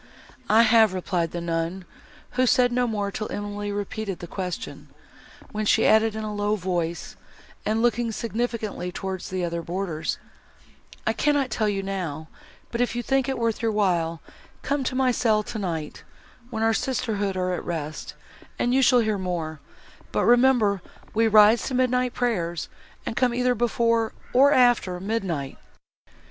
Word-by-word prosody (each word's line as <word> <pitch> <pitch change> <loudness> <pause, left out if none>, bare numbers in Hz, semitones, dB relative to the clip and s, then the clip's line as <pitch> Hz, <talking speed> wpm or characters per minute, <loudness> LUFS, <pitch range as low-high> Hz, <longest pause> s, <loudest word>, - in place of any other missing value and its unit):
"I 220 +2 +6
have," 220 -3 +5
replied 175 -2 -1
the 175 - -5
nun, 170 +2 -2 0.5
who 255 0 +2
said 245 0 +4
no 245 0 +1
more 205 -3 -2
till 215 +2 -5
Emily 205 0 -4
repeated 205 -1 -4
the - - -8
question, 185 +6 -6 0.6
when 215 0 -2
she 225 - +4
added 220 0 +4
in 220 - -4
a 215 -1 -4
low 205 +1 0
voice, 175 -3 -3 0.5
and 220 +2 +1
looking 240 -1 +1
significantly 225 -5 -3
towards 190 +1 -5
the 185 -1 -2
other 170 0 -3
boarders, 170 -2 -3 0.9
"I - - +2
cannot 285 -4 +1
tell 215 -1 +1
you 195 -1 -2
now, 170 -6 -4 0.4
but, 235 - -1
if 245 - 0
you 240 - -2
think 270 +2 +1
it 265 - -1
worth 230 -2 -1
your 225 -1 +1
while, 170 -6 0 0.4
come 280 +1 0
to 255 - -2
my 260 -1 +3
cell, 220 -3 +2
tonight, 175 -9 -4 0.5
when 220 -2 -2
our 225 0 +3
sisterhood 215 -6 -1
are 185 0 0
at - - -3
rest, 155 -3 -5 0.4
and 245 - +1
you 265 - +4
shall 250 -1 +5
hear 215 -3 0
more; 165 -4 -3 0.5
but - - +1
remember 240 -5 +4 0.3
we 225 +1 +3
rise 215 +1 +6
to 260 - -2
midnight 250 -1 +1
prayers, 175 -9 -1 0.4
and - - -3
come 245 0 +2
either 250 0 +2
before, 230 -1 +1 0.2
or 275 +3 +6
after 245 -9 +3
midnight." 185 -9 -3
215 Hz, 160 wpm, -25 LUFS, 185-240 Hz, 0.9 s, I